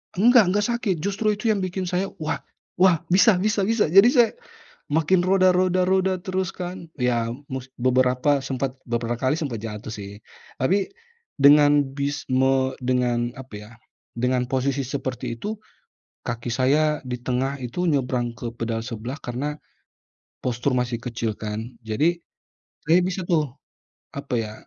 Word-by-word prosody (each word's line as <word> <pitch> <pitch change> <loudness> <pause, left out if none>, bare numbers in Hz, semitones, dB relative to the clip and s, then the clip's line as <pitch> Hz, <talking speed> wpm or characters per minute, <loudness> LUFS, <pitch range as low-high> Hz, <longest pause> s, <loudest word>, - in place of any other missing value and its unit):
Enggak 235 +4 +6
enggak 205 +3 +1
sakit, 220 -6 0
justru 210 +1 0
itu 220 +1 0
yang 205 - 0
bikin 185 +1 -3
saya, 185 +2 0
"Wah! 155 - -2 0.4
Wah, 180 -4 +5
bisa 195 +3 +5
bisa 205 0 +1
bisa" 225 -6 +2
jadi 195 +8 +7
saya, 240 -5 +5 0.6
makin 160 +4 +3
roda 185 0 +4
roda 185 0 +2
roda 190 0 +2
terus 185 -1 -2
kan 180 -1 -6
ya, 120 -3 0 0.2
mus 130 0 -5
beberapa 130 +3 +2
sempet, 135 0 -3
beberapa 120 0 -2
kali 130 +3 +1
sempat 140 -9 -3
jatuh 105 0 -6
sih. 100 -1 -8 0.4
Tapi, 190 +9 +1 0.5
dengan, 145 0 +6
bis 145 +1 -2
me 130 0 +2
dengan 125 -1 0
apa 130 -3 -11
ya, 105 +2 -10 0.4
dengan 125 +1 0
posisi 135 +1 0
seperti 130 -4 -4
itu, 210 - -5 0.7
kaki 120 0 -4
saya 145 +5 +2
di 125 -1 -5
tengah 130 +2 -2
itu 125 +9 -3
nyebrang 125 -6 0
ke 115 0 -6
pedal 115 -1 -2
sebelah 120 +4 -6
karena, 140 +5 -4 0.8
postur 125 +2 -1
masih 120 -1 -2
kecil 115 -3 -3
kan. 105 0 -5 0.2
Jadi, 145 +11 +1 0.7
saya 165 +3 +5
bisa 185 0 -2
tuh, 155 -6 +1 0.7
apa 140 -2 -4
ya, 110 -1 -5
135 Hz, 150 wpm, -24 LUFS, 125-180 Hz, 0.8 s, jadi